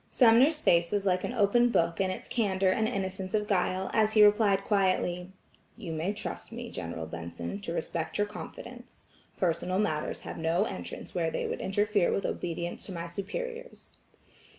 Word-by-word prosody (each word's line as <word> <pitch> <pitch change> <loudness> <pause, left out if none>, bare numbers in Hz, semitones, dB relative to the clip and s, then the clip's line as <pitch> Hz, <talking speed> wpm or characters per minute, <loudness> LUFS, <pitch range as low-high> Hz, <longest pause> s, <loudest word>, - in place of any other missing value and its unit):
Sumner's 255 +6 +5
face 170 - +3
was 205 -1 0
like 185 -1 +2
an - - -2
open 240 +3 +4
book 170 -5 +1
in 190 - +1
its 185 - -5
candor 195 -5 +1
and 220 +3 +1
innocence 190 -3 -3
of 210 -1 +1
guile, 190 -1 0
as 215 -1 +3
he 215 - +7
replied 205 -2 +4
quietly: 185 -3 +1 0.5
"You 165 - -6
may 160 +4 -1
trust 210 +1 -6
me, 235 0 -7
General 85 -1 -5
Benson, 85 - -6
to 200 -5 -5
respect 165 -1 -3
your 205 - +2
confidence. 240 +3 -10 0.4
Personal 180 0 0
matters 155 -7 -1
have - - -7
no 165 +4 +2
entrance 195 -4 -6
where 170 -3 0
they - - -2
would - - -3
interfere 205 -1 +1
with 195 - -1
obedience 170 0 -3
to - - -7
my 170 -2 -4
superiors." 475 - -6
195 Hz, 175 wpm, -29 LUFS, 170-215 Hz, 0.5 s, he